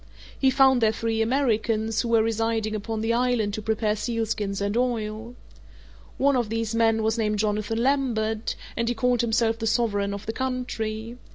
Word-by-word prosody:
He 265 - +4
found 265 -1 +4
there 220 -1 +4
three 225 0 -1
Americans, 225 -3 +1
who - - -3
were 225 -1 +4
residing 225 -1 -1
upon 215 +1 -3
the 225 +1 +1
island 240 -4 +1
to 215 - -3
prepare 215 0 0
sealskins 215 -3 -2
and 200 +1 -1
oil. 230 -1 -2 0.8
One 280 +1 +3
of 240 -4 0
these 225 0 -2
men 225 -1 +2
was 220 +1 0
named 210 -1 0
Jonathan 215 +2 -1
Lambert, 230 -5 0 0.2
and 230 0 0
he 240 - -1
called 245 +1 +2
himself 230 -1 +1
the 225 - -2
sovereign 205 -3 +1
of 200 +1 -9
the 220 - -3
country. 240 -2 -4
225 Hz, 175 wpm, -25 LUFS, 215-240 Hz, 0.8 s, He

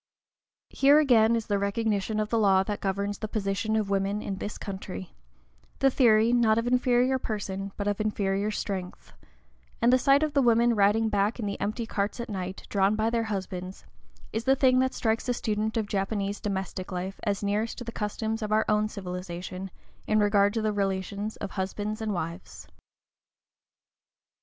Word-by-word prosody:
Here, 280 +2 +5
again, 235 -6 +5
is 225 -2 -2
the 205 -1 0
recognition 210 +1 -1
of 210 0 -1
the 230 - +1
law 195 -3 +4
that 205 +1 -4
governs 200 +1 -2
the 215 - -3
position 210 0 -1
of 210 -2 0
woman 195 +1 0
in 195 -1 -4
this 205 - -5
country, 190 -2 -7 0.6
the 270 0 +3
theory, 230 -3 +4
not 225 -2 +4
of 230 - 0
inferior 250 +1 +2
position, 195 -4 -4
but 205 - -2
of 205 +1 0
inferior 205 -1 0
strength; 195 -4 -5 0.7
and 240 +2 +4
the 255 - +5
sight 275 +3 +4
of 305 -2 -1
the 280 - +4
women 235 -1 +4
riding 210 +1 +3
back 205 +3 0
in 220 - -2
the 200 -1 -4
empty 220 +3 -2
carts 205 +2 -2
at 235 +1 -5
night, 185 -1 -5
drawn 200 +1 +2
by 220 +1 0
their 230 -1 0
husbands, 190 -3 -5 0.5
is 225 +1 -2
the 270 - +5
thing 255 -1 +4
that 260 0 +1
strikes 225 +2 0
a 245 - +1
student 220 0 -1
of 220 - 0
Japanese 200 0 -2
domestic 190 -2 -4
life 185 +2 -4
as 205 -2 -1
nearest 210 +3 -1
to - - -6
the 230 - -6
customs 220 +1 -3
of 215 -1 -3
our 215 +1 +3
own 210 0 +2
civilization 180 -1 -6 0.4
in 215 - +2
regard 205 -1 +4
to 225 0 -2
the 215 -1 +1
relations 200 +1 -2
of 200 - -6
husbands 205 +3 -3
and 220 -1 -1
wives. 170 -1 -6
210 Hz, 180 wpm, -27 LUFS, 195-225 Hz, 0.7 s, Here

